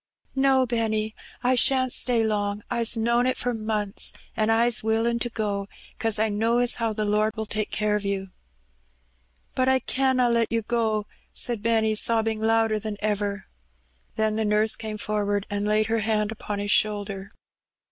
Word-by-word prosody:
No, 270 Hz, -1 st, +3 dB
Benny, 220 Hz, -2 st, -1 dB, 0.3 s
I 250 Hz, +1 st, +3 dB
shan't 255 Hz, 0 st, +3 dB
stay 240 Hz, -3 st, +2 dB
long. 205 Hz, -1 st, -1 dB
I's 235 Hz, -1 st, 0 dB
known 235 Hz, +2 st, +2 dB
it 255 Hz, -, 0 dB
for 245 Hz, 0 st, -1 dB
months, 215 Hz, -2 st, -2 dB, 0.2 s
an' 215 Hz, 0 st, +1 dB
I's 230 Hz, +1 st, +3 dB
willin' 225 Hz, +2 st, +1 dB
to 240 Hz, -, -1 dB
go, 205 Hz, -3 st, -3 dB, 0.3 s
'cause 225 Hz, -1 st, +1 dB
I 220 Hz, +1 st, +2 dB
know 225 Hz, +3 st, +1 dB
as 245 Hz, 0 st, +2 dB
how 230 Hz, -1 st, 0 dB
the 215 Hz, 0 st, -2 dB
Lord 210 Hz, +1 st, +1 dB
will 220 Hz, -1 st, -3 dB
take 215 Hz, 0 st, -2 dB
care 210 Hz, -1 st, 0 dB
of 210 Hz, -, -2 dB
you." 195 Hz, -1 st, -3 dB, 1.2 s
"But 255 Hz, 0 st, +1 dB
I 265 Hz, -, +4 dB
canna 260 Hz, 0 st, +1 dB
let 235 Hz, -1 st, +1 dB
you 230 Hz, -1 st, 0 dB
go," 220 Hz, -2 st, 0 dB, 0.3 s
said 235 Hz, -4 st, 0 dB
Benny, 220 Hz, -1 st, +2 dB
sobbing 225 Hz, 0 st, +1 dB
louder 225 Hz, -1 st, +2 dB
than 210 Hz, -1 st, -5 dB
ever. 205 Hz, -1 st, -2 dB, 0.7 s
Then 220 Hz, 0 st, 0 dB
the 220 Hz, -, 0 dB
nurse 210 Hz, +1 st, +2 dB
came 215 Hz, -1 st, -6 dB
forward, 205 Hz, -1 st, -1 dB
and 205 Hz, 0 st, -1 dB
laid 215 Hz, +1 st, +2 dB
her 225 Hz, +1 st, 0 dB
hand 215 Hz, 0 st, 0 dB
upon 210 Hz, -1 st, -5 dB
his 205 Hz, 0 st, -1 dB
shoulder. 205 Hz, -2 st, 0 dB
220 Hz, 175 wpm, -25 LUFS, 210-235 Hz, 1.2 s, I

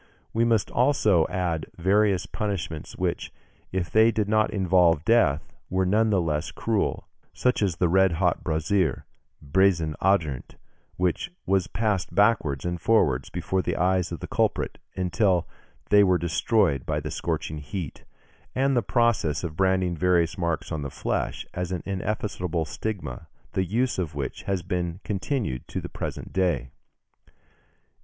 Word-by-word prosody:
We 115 Hz, -, +2 dB
must 115 Hz, -3 st, +1 dB
also 110 Hz, -, +3 dB
add 85 Hz, -4 st, -2 dB
various 95 Hz, +1 st, +2 dB
punishments 95 Hz, -7 st, -4 dB
which, -, -, -2 dB, 0.4 s
if 90 Hz, -3 st, -2 dB
they 110 Hz, +1 st, +6 dB
did 110 Hz, -2 st, 0 dB
not 110 Hz, 0 st, +3 dB
involve 90 Hz, -5 st, +3 dB
death, 85 Hz, -11 st, +2 dB, 0.2 s
were 95 Hz, +1 st, +1 dB
none 110 Hz, +4 st, +3 dB
the 100 Hz, -3 st, +3 dB
less 75 Hz, -3 st, -1 dB
cruel, -, -, -1 dB, 0.3 s
such 125 Hz, -2 st, +1 dB
as 95 Hz, -5 st, +1 dB
the 90 Hz, +1 st, +2 dB
red 95 Hz, +1 st, +4 dB
hot 80 Hz, -, +1 dB
brazier, 80 Hz, -1 st, 0 dB, 0.4 s
bassin 85 Hz, 0 st, +2 dB
ardent, 80 Hz, -9 st, 0 dB, 0.4 s
which 90 Hz, -, 0 dB, 0.2 s
was 95 Hz, -1 st, +2 dB
passed 105 Hz, -4 st, -1 dB
backwards 100 Hz, -, +2 dB
and 85 Hz, -1 st, -2 dB
forwards 75 Hz, -, +2 dB
before 95 Hz, 0 st, -1 dB
the -, -, -2 dB
eyes 90 Hz, 0 st, +1 dB
of 85 Hz, -, -5 dB
the -, -, -5 dB
culprit, -, -, 0 dB, 0.2 s
until 90 Hz, -1 st, +1 dB, 0.4 s
they 105 Hz, 0 st, +7 dB
were 95 Hz, -2 st, +4 dB
destroyed 85 Hz, -, +1 dB
by -, -, -1 dB
the -, -, -5 dB
scorching 80 Hz, -2 st, -3 dB
heat; 80 Hz, +1 st, -6 dB, 0.5 s
and 135 Hz, +1 st, +2 dB
the 120 Hz, -, +3 dB
process 110 Hz, -, +1 dB
of 80 Hz, -3 st, -4 dB
branding 95 Hz, -1 st, +2 dB
various 85 Hz, -1 st, +2 dB
marks 85 Hz, -2 st, -2 dB
on 80 Hz, -2 st, -2 dB
the 70 Hz, -, -4 dB
flesh, -, -, -2 dB
as 90 Hz, 0 st, -3 dB
an 90 Hz, -3 st, -3 dB
ineffaceable 95 Hz, -4 st, -2 dB
stigma, 100 Hz, -4 st, -5 dB, 0.2 s
the 95 Hz, -, 0 dB
use 120 Hz, +5 st, 0 dB
of 80 Hz, -6 st, -3 dB
which 70 Hz, -2 st, -4 dB
has 95 Hz, -3 st, 0 dB
been 90 Hz, -1 st, -2 dB
continued 100 Hz, -, -2 dB
to -, -, -4 dB
the -, -, -7 dB
present -, -, -6 dB
day. 80 Hz, -10 st, 0 dB
90 Hz, 150 wpm, -26 LUFS, 80-105 Hz, 0.5 s, they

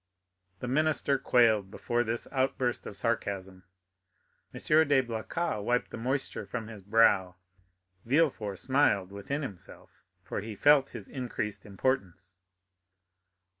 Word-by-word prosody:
The 125 Hz, -, -3 dB
minister 145 Hz, 0 st, +1 dB
quailed 110 Hz, -5 st, +3 dB
before 120 Hz, +3 st, -1 dB
this 115 Hz, 0 st, -3 dB
outburst 130 Hz, -2 st, -1 dB
of 100 Hz, -, -7 dB
sarcasm. 95 Hz, -4 st, -3 dB, 0.9 s
M. -, -, -8 dB, 0.3 s
de 140 Hz, -2 st, +4 dB
Blacas 115 Hz, +3 st, -3 dB
wiped 125 Hz, +3 st, 0 dB
the -, -, -6 dB
moisture 130 Hz, +4 st, -2 dB
from 115 Hz, -3 st, -5 dB
his 105 Hz, -3 st, -9 dB
brow. 95 Hz, -3 st, +3 dB, 0.7 s
Villefort 120 Hz, -7 st, +1 dB
smiled 130 Hz, -9 st, +2 dB
within 140 Hz, +9 st, -4 dB
himself, 100 Hz, -10 st, -9 dB, 0.3 s
for -, -, -4 dB
he 110 Hz, +1 st, -7 dB
felt 145 Hz, +4 st, +5 dB
his 110 Hz, -5 st, -9 dB
increased 105 Hz, -6 st, -4 dB
importance. 95 Hz, -4 st, -2 dB
115 Hz, 120 wpm, -29 LUFS, 100-130 Hz, 0.9 s, felt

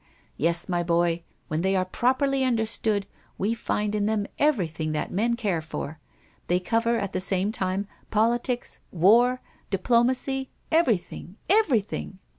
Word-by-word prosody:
Yes, 170 Hz, +2 st, 0 dB
my 175 Hz, -2 st, 0 dB
boy, 170 Hz, 0 st, +1 dB, 0.3 s
when 155 Hz, +1 st, -1 dB
they 190 Hz, +2 st, +1 dB
are 185 Hz, -1 st, +2 dB
properly 265 Hz, +7 st, +1 dB
understood, 220 Hz, -4 st, 0 dB, 0.3 s
we 210 Hz, +4 st, 0 dB
find 210 Hz, -2 st, -2 dB
in 210 Hz, -1 st, +1 dB
them 215 Hz, -2 st, 0 dB
everything 170 Hz, -, +1 dB
that 150 Hz, -, -2 dB
men 230 Hz, +5 st, +1 dB
care 200 Hz, -9 st, -1 dB
for 160 Hz, -1 st, -6 dB, 0.5 s
they 180 Hz, +1 st, +2 dB
cover, 230 Hz, +5 st, +1 dB
at 200 Hz, -3 st, -3 dB
the 185 Hz, -, -1 dB
same 190 Hz, +2 st, 0 dB
time, 195 Hz, -2 st, -2 dB, 0.2 s
politics, 240 Hz, +3 st, 0 dB
war, 235 Hz, +9 st, +4 dB, 0.3 s
diplomacy, 250 Hz, +6 st, +1 dB, 0.2 s
everything, 225 Hz, -, 0 dB
everything! 255 Hz, -, +1 dB
210 Hz, 135 wpm, -26 LUFS, 180-240 Hz, 0.5 s, war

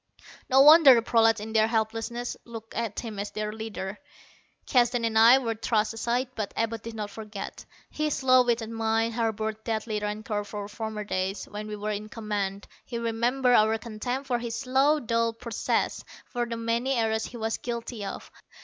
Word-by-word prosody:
No 265 Hz, 0 st, +6 dB
wonder 300 Hz, -2 st, +9 dB
the 230 Hz, -, +2 dB
prolats 225 Hz, -1 st, +4 dB
in 220 Hz, +1 st, -6 dB
their 220 Hz, -1 st, +4 dB
helplessness 225 Hz, +2 st, -2 dB
looked 225 Hz, -1 st, -10 dB
to 230 Hz, -2 st, -3 dB
him 220 Hz, -4 st, -6 dB
as 205 Hz, -, -3 dB
their 215 Hz, 0 st, -4 dB
leader. 210 Hz, -3 st, -6 dB, 0.7 s
Keston 240 Hz, -2 st, +2 dB
and 225 Hz, -1 st, -1 dB
I 230 Hz, +4 st, +8 dB
were 235 Hz, -4 st, -1 dB
thrust 220 Hz, 0 st, 0 dB
aside. 240 Hz, +3 st, -1 dB
But 215 Hz, -4 st, -4 dB
Abud 225 Hz, -1 st, -1 dB
did 230 Hz, 0 st, -8 dB
not 210 Hz, -2 st, -5 dB
forget. 210 Hz, -2 st, -8 dB, 0.3 s
His 305 Hz, -1 st, -1 dB
slow 255 Hz, -2 st, +5 dB
witted 230 Hz, -2 st, -1 dB
mind 225 Hz, 0 st, 0 dB
harbored 220 Hz, -1 st, -2 dB
deadly 220 Hz, -1 st, -2 dB
rancor 210 Hz, 0 st, -3 dB
for 205 Hz, 0 st, -6 dB
former 215 Hz, 0 st, -5 dB
days, 190 Hz, 0 st, -2 dB
when 210 Hz, +1 st, -7 dB
we 210 Hz, -, -5 dB
were 210 Hz, +1 st, -3 dB
in 210 Hz, +1 st, -5 dB
command. 205 Hz, -3 st, -3 dB, 0.2 s
He 240 Hz, -, -5 dB
remembered 240 Hz, +3 st, +1 dB
our 220 Hz, 0 st, +4 dB
contempt 240 Hz, +4 st, -4 dB
for 245 Hz, -3 st, 0 dB
his 235 Hz, -1 st, -4 dB
slow 270 Hz, +4 st, +2 dB
dull 230 Hz, -2 st, 0 dB
processes; 230 Hz, -1 st, -2 dB, 0.2 s
for 240 Hz, -1 st, -3 dB
the 230 Hz, -1 st, -4 dB
many 230 Hz, +3 st, 0 dB
errors 220 Hz, -2 st, 0 dB
he 240 Hz, -, -8 dB
was 225 Hz, 0 st, -2 dB
guilty 235 Hz, -2 st, -5 dB
of. 195 Hz, -, -7 dB
225 Hz, 180 wpm, -27 LUFS, 215-240 Hz, 0.7 s, wonder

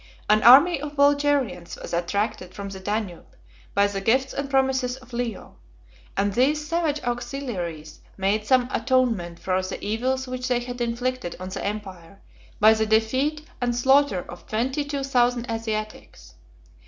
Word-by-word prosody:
An 215 Hz, +1 st, +4 dB
army 275 Hz, +6 st, +7 dB
of 295 Hz, 0 st, -6 dB
Bulgarians 280 Hz, -11 st, +1 dB
was -, -, -8 dB
attracted 180 Hz, +1 st, -2 dB
from 200 Hz, -1 st, -6 dB
the 195 Hz, -1 st, -8 dB
Danube 205 Hz, -2 st, -4 dB, 0.4 s
by 200 Hz, 0 st, +4 dB
the 200 Hz, -1 st, -2 dB
gifts 260 Hz, +6 st, +1 dB
and 280 Hz, 0 st, -3 dB
promises 265 Hz, -2 st, +1 dB
of 255 Hz, -1 st, -17 dB
Leo; 235 Hz, -3 st, -4 dB, 0.6 s
and 200 Hz, 0 st, +1 dB
these 295 Hz, +6 st, +2 dB
savage 325 Hz, -3 st, 0 dB
auxiliaries 235 Hz, -, -4 dB, 0.2 s
made 200 Hz, +2 st, +1 dB
some 255 Hz, -2 st, +4 dB
atonement 225 Hz, -9 st, 0 dB
for 185 Hz, +1 st, -1 dB
the 185 Hz, -, -5 dB
evils 255 Hz, +5 st, -1 dB
which 255 Hz, 0 st, -4 dB
they 250 Hz, -2 st, +1 dB
had 245 Hz, 0 st, -6 dB
inflicted 240 Hz, -4 st, -2 dB
on 185 Hz, 0 st, -6 dB
the 190 Hz, -, -5 dB
empire, 195 Hz, -3 st, -6 dB, 0.4 s
by 215 Hz, +1 st, +7 dB
the 220 Hz, 0 st, 0 dB
defeat 260 Hz, +8 st, +1 dB, 0.2 s
and 240 Hz, -1 st, 0 dB
slaughter 265 Hz, -5 st, +3 dB
of 175 Hz, -, -11 dB
twenty 260 Hz, +7 st, -1 dB
two 285 Hz, -1 st, -4 dB
thousand 245 Hz, -2 st, +1 dB
Asiatics. 220 Hz, -1 st, -5 dB
240 Hz, 155 wpm, -24 LUFS, 200-265 Hz, 0.6 s, army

